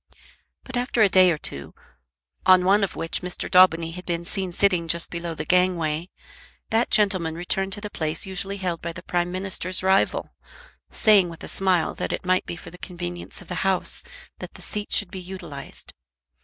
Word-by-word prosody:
But 255 -1 -5
after 245 -2 +2
a 200 - +5
day 185 -1 +6
or 165 - +1
two, 70 - -5 0.7
on 185 -1 +6
one 200 +2 +4
of 195 - -1
which 165 - -1
Mr. 180 -1 -2
Daubeny 170 -3 +5
had 180 +2 -8
been 170 -1 -2
seen 190 0 -2
sitting 180 -2 +2
just 170 +1 -1
below 170 -1 -4
the - - -5
gangway, 175 -2 +1 0.6
that 225 +2 +2
gentleman 185 -6 +2
returned 190 +3 -1
to 205 - -6
the 210 -1 -6
place 155 -3 -3
usually 195 +1 -4
held 180 -4 -3
by 170 0 -4
the 180 - -10
Prime 175 -1 -1
Minister's 185 -1 -1
rival, 190 +1 +2 0.6
saying 200 -5 +4
with 165 - -11
a - - -6
smile 185 -3 +1
that - - -3
it - - -4
might 185 0 +1
be - - -4
for 175 - -11
the 180 - -13
convenience 175 +1 -6
of - - -20
the 180 - -3
House 190 -1 +1 0.4
that - - -9
the - - -10
seat 210 0 -4
should 205 -4 +1
be 190 - -6
utilised. 175 -6 -9
180 Hz, 195 wpm, -24 LUFS, 170-195 Hz, 0.7 s, day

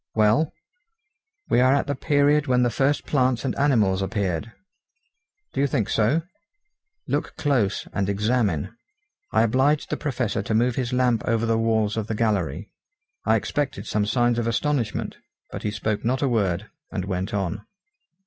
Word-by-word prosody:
"Well?" 110 +8 +3 1.0
"We - - +3
are 130 +2 +5
at 140 - +1
the 145 - -1
period 145 +1 +2
when 125 -1 +3
the 120 - +2
first 140 +5 +1
plants 130 -3 +1
and 130 - -1
animals 110 -10 +2
appeared." 95 -1 -2 1.0
"Do - - 0
you 140 - +3
think 110 -6 -1
so?" 120 +10 +2 0.8
"Look - - -2
close, 120 -9 0
and 100 -1 -1
examine." 105 - 0 0.6
I - - +4
obliged 130 +6 +2
the - - 0
Professor 125 -7 -1
to 110 +2 -2
move 120 +2 +2
his 125 -2 -2
lamp 125 -3 +2
over 115 0 +1
the 115 0 +2
walls 110 -1 +1
of 110 -2 -2
the 110 - -2
gallery. 105 -5 -1 0.5
I - - +4
expected 145 -2 -2
some 105 -1 0
signs 120 +1 +2
of 115 - -1
astonishment; 120 -1 -1 0.3
but - - -6
he 105 - -1
spoke 105 0 -2
not 130 +4 0
a - - +3
word, 105 -5 0 0.2
and 95 -3 -3
went 95 -1 -3
on. 100 0 -2
115 Hz, 165 wpm, -24 LUFS, 105-130 Hz, 1.0 s, are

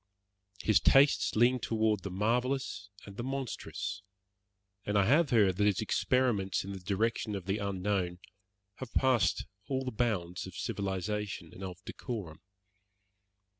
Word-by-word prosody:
His 110 - +5
tastes 140 +2 +4
leaned 120 +2 +4
toward 110 -1 +1
the 100 - -5
marvellous 115 +2 -1 0.2
and 100 0 -11
the 120 - -3
monstrous, 135 -1 -4 0.8
and 105 0 0
I 100 - +4
have 145 - +4
heard 100 -6 +4
that 105 - +3
his 100 -3 +2
experiments 110 -3 +1
in 100 - -6
the 95 - -6
direction 105 +3 -1
of 95 -3 -5
the 100 +2 -1
unknown 95 -2 -1 0.6
have 130 -3 -8
passed 120 - +3 0.2
all 130 0 -1
the 130 - -2
bounds 95 -7 -1
of 95 - -10
civilization 100 -2 -3
and 95 - -9
of 90 -1 -8
decorum. 95 -11 -6
105 Hz, 140 wpm, -31 LUFS, 95-120 Hz, 0.8 s, His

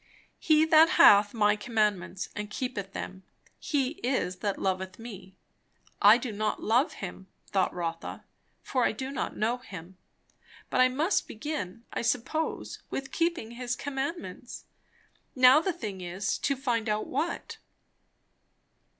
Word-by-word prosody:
"He 310 0 +4
that 320 +1 +7
hath 205 0 +8
my 210 -2 +3
commandments 210 -5 -1
and 210 0 -4
keepeth 210 -4 -4
them, 190 0 -6 0.4
he 280 -6 0
it - - -21 0.2
is 180 +1 -5
that 200 +1 -2
loveth 190 0 -2
me." 195 -5 -10 0.7
I 210 +2 +8
do 245 -1 -4
not 215 +1 -1
love 245 +7 +2
Him, 190 0 -8 0.2
thought 190 -2 +1
Rotha, 165 -1 -5 0.4
for 255 -2 0
I - - +2
do 260 +4 -5
not 280 - -3
know 230 +3 +1
Him; 185 -5 -11 0.7
but - - +3
I 255 - +7
must 295 +9 0
begin, 230 - -5
I - - -1
suppose, 250 +7 -2
with 270 0 -5
keeping 335 -9 -1
his 245 +1 -3
commandments. 285 +6 -5 0.7
Now 255 +3 +7
the 380 - 0
thing 205 - -6
is, 180 +3 -2
to 275 - 0
find 240 -4 -1
out 210 0 0
what. 310 +6 -3
225 Hz, 140 wpm, -28 LUFS, 195-270 Hz, 0.7 s, hath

